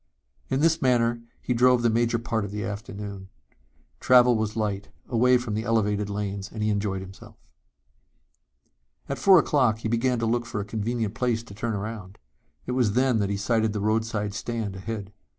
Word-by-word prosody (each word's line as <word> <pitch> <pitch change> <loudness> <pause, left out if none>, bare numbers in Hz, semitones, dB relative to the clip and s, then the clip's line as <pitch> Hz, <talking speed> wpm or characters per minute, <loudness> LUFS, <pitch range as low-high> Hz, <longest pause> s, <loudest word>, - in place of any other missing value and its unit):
In 135 +1 0
this 165 0 +3
manner 120 -2 +2 0.2
he 125 - 0
drove 125 0 +4
the 120 - +4
major 115 +1 +1
part 115 -1 -2
of 100 - -4
the 105 +1 -4
afternoon. 100 -2 -6 0.7
Travel 125 -1 +5
was 110 -1 -2
light, 105 -2 -2 0.2
away 125 +1 +4
from 120 -3 -4
the 110 - -1
elevated 105 -3 0
lanes 100 0 -4
and 110 -1 -4
he 105 - +1
enjoyed 100 -2 -1
himself. 95 0 -12 1.7
At 140 - -4
four 195 -2 +7
o'clock 130 -8 +3
he 110 - -4
began 120 +2 +1
to 115 - -1
look 120 +1 0
for 115 - -4
a 100 - -3
convenient 110 0 -2
place 115 -1 -1
to 110 - -12
turn 110 +3 -3
around. 100 -2 -6 0.5
It - - -4
was 125 -5 +1
then 125 -1 +2
that 100 -1 0
he 100 - -1
sighted 110 +2 +1
the 105 - -2
roadside 110 -1 -1
stand 110 -3 -4
ahead. 100 0 -6
110 Hz, 185 wpm, -26 LUFS, 105-120 Hz, 1.7 s, four